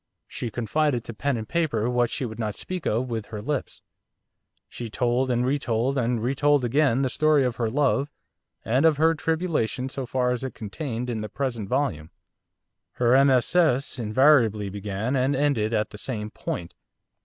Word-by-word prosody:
She 120 - -5
confided 120 +3 0
to 115 - -7
pen 140 +3 -1
and 110 -1 -5
paper 140 -10 0
what 120 -1 +1
she 130 - -3
would 110 -1 -7
not 105 -3 -2
speak 185 -3 -4
of 120 +4 0
with 110 -3 -3
her 110 -2 -6
lips. 135 +5 -4 0.8
She 120 -2 -7
told, 125 +3 0
and 125 0 +1
re 140 +3 +1
told, 120 +1 0
and 120 -3 0
re 125 +3 +1
told 145 -1 +2
again, 135 +1 +2
the - - +2
story 155 -1 +3
of 125 -2 -2
her 115 -2 0
love, 140 +2 +1 0.6
and 125 +5 +2
of 160 -3 +4
her 160 +2 +4
tribulation 155 -6 -1
so 130 -1 -5
far 125 -1 0
as 125 0 -2
it 130 - -4
is - - -18
contained 115 +3 -4
in 115 -3 -3
the 105 - -5
present 120 -4 -3
volume. 80 - -1 0.8
Her 120 0 +2
MSS. 135 +1 +2
invariably 115 -3 +3
began 100 +5 -3
and 135 +2 +1
ended 135 -6 +1
at 110 -2 0
the 105 - -9
same 105 -4 -4
point. 85 -5 -5
125 Hz, 185 wpm, -25 LUFS, 110-140 Hz, 0.8 s, of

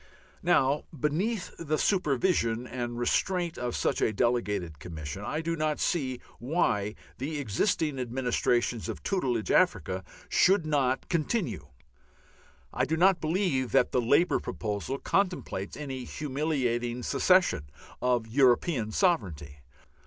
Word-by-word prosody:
Now 135 +3 +2
beneath 180 +8 -1
the 155 -2 -1
supervision 135 - +1
and 120 -1 -4
restraint 175 +8 0
of 120 -1 -2
such - - 0
a - - +3
delegated 105 -8 -1
Commission 80 +2 -6
I 150 +9 -2
do 165 +1 -1
not 155 -1 -1
see 130 -7 0 0.2
why 110 - 0 0.2
the 150 +4 -3
existing 145 - 0
administrations 120 -2 0
of - - -6
tutelage 130 - 0
Africa 95 - +2 0.2
should 190 -2 +4
not 135 -4 +1
continue. 155 - -1 1.1
I - - 0
do 160 - -1
not 185 0 +4
believe 155 -6 0
that 135 -2 +4
the 125 - +2
Labour 145 +9 +3
proposal 105 +5 -3
contemplates 180 - -1
any 135 -4 -5
humiliating 130 -5 -2
cession 180 - +3 0.3
of 125 -2 +1
European 120 0 +2
sovereignty. 90 - 0
130 Hz, 120 wpm, -28 LUFS, 115-160 Hz, 1.1 s, should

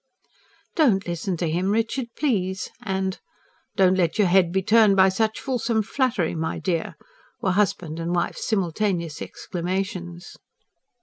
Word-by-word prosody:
"Don't 230 - +3
listen 175 +1 -2
to 170 - -1
him, 175 +4 0
Richard, 225 +4 0
please!" 190 -10 -1
and: 190 0 -2 0.6
"Don't 185 -1 +4
let 175 -3 +1
your 205 -3 +4
head 180 -2 +4
be 190 +1 0
turned 215 -1 +5
by 190 0 +6
such 220 +3 0
fulsome 235 -4 0
flattery, 225 - 0
my 160 0 -2
dear!" 170 -4 -2 0.4
were 190 - 0
wife 205 -2 +3
and 160 0 -6
husband's 170 +1 -1
simultaneous 175 -5 -1
exclamations. 180 0 -4
190 Hz, 135 wpm, -24 LUFS, 175-215 Hz, 0.6 s, by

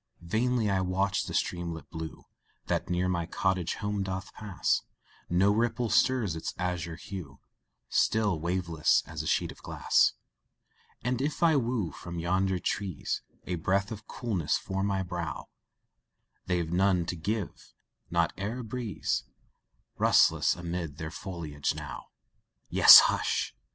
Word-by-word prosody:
Vainly 115 +5 +1
I 95 -2 +1
watch 95 +2 0
the - - -5
streamlet 85 -4 -2
blue 80 -1 -7 0.4
That - - -1
near 90 +1 +1
my 85 -2 -1
cottage 95 -1 0
home 105 -1 -2
doth 95 -1 -4
pass, 100 -5 -1 0.5
No 95 +4 +4
ripple 115 +1 0
stirs 120 -9 +2
its 80 - -5
azure 90 -2 -3
hue, 85 -4 -8 0.5
Still 105 -7 +2
waveless, 85 -2 +1
as 80 -1 -5
a 80 - -6
sheet - - +1
of - - -15
glass - - +2 0.9
And 125 +1 -1
if 150 +4 -1
I 165 -2 +5
woo 120 - 0
from 85 0 -8
yonder 95 +3 +1
trees 90 -2 -2 0.2
A 90 - -2
breath 100 +4 +1
of 110 0 -8
coolness 100 - -1
for 95 0 -4
my 95 -1 0
brow, 85 -3 -5 1.0
They've 85 -3 0
none 90 -1 +3
to 90 - -3
give 100 +4 -4 0.4
not 85 -1 +1
e'en 105 +5 -3
a - - -7
breeze 115 -2 -3 0.7
Rustles - - +4
amid 85 -3 -5
their 80 -1 -5
foliage 85 -7 -4
now; - - -7 0.6
Yes, - - +11
hush! - - 0
95 Hz, 140 wpm, -29 LUFS, 85-105 Hz, 1.0 s, Yes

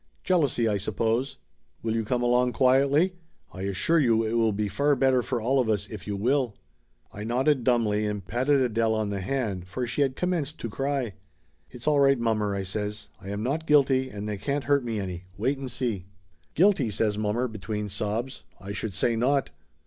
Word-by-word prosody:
Jealousy, 145 -10 +2
I 105 -2 +1
sup 105 +1 -4
pose. 115 +6 0 0.5
Will 110 -1 0
you 115 0 0
come 120 +3 -1
along 125 0 +3
quietly? 140 +7 +3 0.4
I 95 - -7
assure 160 - +2
you 115 -5 +3
it 110 0 -2
will 115 -1 +3
be 105 +1 -1
far 140 +9 +2
better 130 -1 +3
for 120 0 -2
all 130 +5 +1
of 120 -3 +1
us 105 -3 0
if 110 - -8
you 100 - -2
will." 125 +1 +1 0.6
I 105 - -6
nodded 130 +4 +1
dumbly, 110 -4 +2
and 105 -3 -4
patted 130 +6 +2
Adele 115 -2 +1
on 110 -2 -1
the 100 -1 -3
hand, 100 -6 -2
for 125 +7 -3
she 120 +4 -2
had 135 -2 +1
commenced 165 -4 -2
to 115 - -5
cry. 135 -3 -2 0.6
"It's 125 +3 -10
all 150 -1 +4
right, 140 -1 +5
mommer," 110 -3 0
I 100 - -2
says. 105 +2 -4
"I 95 - -8
am 100 +1 -3
not 155 +6 -2
guilty 135 -3 +4
and 105 0 -6
they 105 -1 -3
can't 140 +8 -2
hurt 140 +1 +2
me 115 -3 -2
any. 90 -2 -5
Wait 135 +7 0
and 135 -1 -5
see." 115 -7 -3 0.5
"Guilty?" 175 - +4
says 105 0 0
mommer 110 +4 0
between 105 -1 -4
sobs. 105 +6 -3 0.2
"I 95 +3 -7
should 105 -2 -4
say 115 +5 +1
not 135 - +1
115 Hz, 200 wpm, -26 LUFS, 105-135 Hz, 0.6 s, right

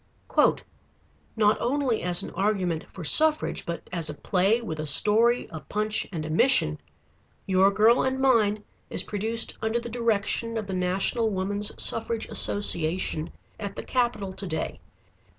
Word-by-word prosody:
"Not 215 -1 +2
only 255 -2 -1
as 180 +1 0
an - - -7
argument 185 -4 -2
for 185 - -9
suffrage 305 - +4
but 170 0 -6
as 165 -3 -2
a 150 - -6
play 195 +7 +1
with 160 -10 -7
a 155 - -4
story, 225 - +3
a 160 - -7
punch, 210 +7 -3
and 160 -4 -5
a - - -6
mission, 155 - +2 0.6
'Your 190 0 +3
Girl 215 +4 +3
and 260 0 -1
Mine' 215 -6 +2 0.3
is - - -2
produced 220 +3 -1
under 220 +2 -1
the 235 - -8
direction 230 0 -2
of 215 - -4
the 195 - -6
National 190 +5 -1
Woman's 200 +1 -1
Suffrage 225 0 +2
Association 170 -4 +2 0.3
at 200 -2 -6
the - - -7
Capitol 235 -6 -2
to 195 - -8
day. 160 -2 -3
205 Hz, 150 wpm, -25 LUFS, 180-230 Hz, 0.6 s, suffrage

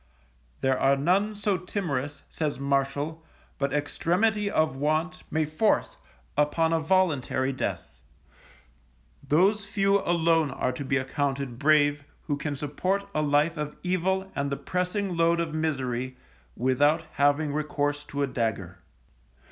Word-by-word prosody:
There 130 -1 +2
are 135 +1 +4
none 190 +9 +1
so 205 -2 0
timorous, 145 -7 -3
says 150 -3 -3
Martial, 140 +3 -1 0.4
but 140 0 0
extremity 195 +8 +1
of 155 -7 +1
want 155 +6 -1
may 160 0 +1
force 155 +8 +1 0.4
upon 160 +2 +2
a 165 - +3
voluntary 155 -6 +1
death; 130 - -3 1.3
those 200 +6 +2
few 200 -1 +2
alone 165 -4 +2
are 125 - -1
to 130 +3 -5
be 135 0 +1
accounted 135 -2 -2
brave 145 -1 +3 0.2
who 145 - -1
can 145 0 -3
support 185 +8 -1
a 155 - +1
life 150 +3 +2
of 150 0 -4
evil 190 +1 0
and 140 0 -1
the 140 - -1
pressing 180 +1 -2
load 170 0 +3
of 165 -2 -2
misery, 130 -5 -2 0.4
without 145 +6 +2
having 145 +1 +2
recount 145 -1 -1
to 140 0 -2
a - - +1
dagger. 100 -8 -3
150 Hz, 135 wpm, -27 LUFS, 140-180 Hz, 1.3 s, are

